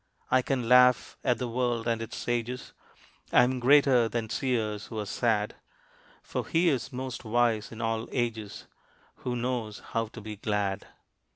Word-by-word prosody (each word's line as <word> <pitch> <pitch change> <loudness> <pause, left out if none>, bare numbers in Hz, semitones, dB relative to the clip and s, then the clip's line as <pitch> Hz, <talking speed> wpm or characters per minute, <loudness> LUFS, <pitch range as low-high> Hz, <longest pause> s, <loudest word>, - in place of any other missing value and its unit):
I 130 - +5
can 125 -2 -1
laugh 125 0 +5
at 125 -3 +2
the 125 - -3
world 120 -1 -1
and 115 -1 0
its 115 0 -6
sages 120 +1 -3 0.6
I 125 - +7
am 130 +1 0
greater 130 -2 +5
than 115 -2 -3
seers 110 -5 -1
who 110 - -7
are 105 - -2
sad, 105 0 0 0.7
For - - -4
he 170 +1 +3
is 135 -1 -1
most 130 -1 -5
wise 115 -1 +1
in 115 0 -7
all 115 0 -1
ages 115 -4 -3 0.5
Who 125 - -3
knows 120 -3 -2
how 115 -1 0
to 115 - -11
be 105 -1 -7
glad. 105 -2 -1
120 Hz, 165 wpm, -28 LUFS, 110-125 Hz, 0.7 s, I